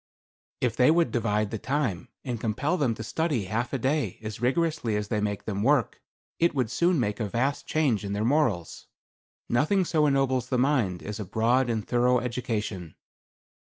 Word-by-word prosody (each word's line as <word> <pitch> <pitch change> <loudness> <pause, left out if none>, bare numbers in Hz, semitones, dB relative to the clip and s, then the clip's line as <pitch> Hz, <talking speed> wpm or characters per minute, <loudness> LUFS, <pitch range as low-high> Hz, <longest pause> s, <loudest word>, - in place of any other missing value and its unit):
"If 120 -3 +1
they 125 +2 +5
would 165 +1 +3
divide 105 -4 0
the 110 - -3
time, 130 - -2 0.2
and 120 -4 -3
compel 140 +10 0
them 135 -9 0
to 110 - -6
study 145 -1 -1
half 110 +5 -2
a 135 - 0
day 130 - -1
as 110 0 -6
rigorously 135 -3 0
as 105 0 -2
they 105 -2 0
make 105 -1 -2
them 100 -2 -2
work, 135 +1 +2 0.4
it 170 -2 +2
would 125 -5 0
soon 175 -2 +2
make 105 -4 -1
a 105 -3 -2
vast 130 +7 -1
change 140 -10 +1
in 100 0 -3
their 105 +2 -1
morals. 120 - 0 0.6
Nothing 165 +10 +2
so 155 -3 +2
ennobles 130 -3 +1
the 125 - +1
mind 125 -10 +1
as 105 +1 -5
a - - -2
broad 115 +6 +1
and 110 -3 -2
thorough 125 +1 +3
education." 110 -8 -4
120 Hz, 185 wpm, -27 LUFS, 105-140 Hz, 0.6 s, they